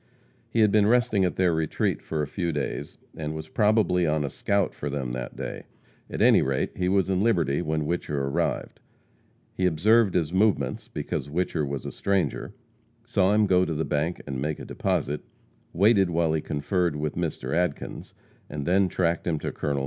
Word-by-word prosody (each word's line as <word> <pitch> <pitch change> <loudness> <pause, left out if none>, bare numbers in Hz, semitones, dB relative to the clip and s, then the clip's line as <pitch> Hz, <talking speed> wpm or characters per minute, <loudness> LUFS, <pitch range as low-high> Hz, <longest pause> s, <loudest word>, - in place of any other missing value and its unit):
He 115 - +1
had 105 -2 +5
been 105 -1 +4
resting 110 -4 +3
at 90 - -1
their 90 -2 +2
retreat 80 -1 -1
for 80 -2 -2
a - - -3
few 85 +3 -2
days, 75 -1 -4 0.2
and 75 0 -4
was 80 0 -6
probably 105 -5 +2
on 75 -1 +1
a 70 - -4
scout 100 -2 0
for 75 - -5
them 70 -3 -3
that 60 0 -5
day. - - -6 0.4
At - - -1
any - - +6
rate, 65 0 0
he 90 0 0
was 95 -1 +2
in 95 0 +1
Liberty 85 -11 +2
when 80 -2 -1
Whicher 75 -2 -2
arrived. 70 - -2 0.7
He 95 - +1
observed 100 +5 +3
his 85 -2 0
movements, 95 -10 +1
because 70 - -4
Whicher 80 -2 -1
was 70 0 -4
a - - -4
stranger; 100 -2 -1 0.5
saw 95 0 +2
him 105 0 +4
go 90 -2 +4
to 85 -3 -2
the 80 - -1
bank 80 +4 -1
and 65 -2 -4
make 75 +1 -2
a - - -8
deposit; 75 +1 -1 0.5
waited 100 0 +4
while 85 -1 +1
he 80 - 0
conferred 80 +3 -1
with 75 0 -2
Mr. 80 -6 -3
Adkins, 90 -4 -2 0.3
and 70 -1 -5
then, 95 +2 +3
tracked 85 -2 0
him 80 -2 +1
to - - -4
Col. 70 -1 -2
85 Hz, 190 wpm, -26 LUFS, 75-95 Hz, 0.7 s, any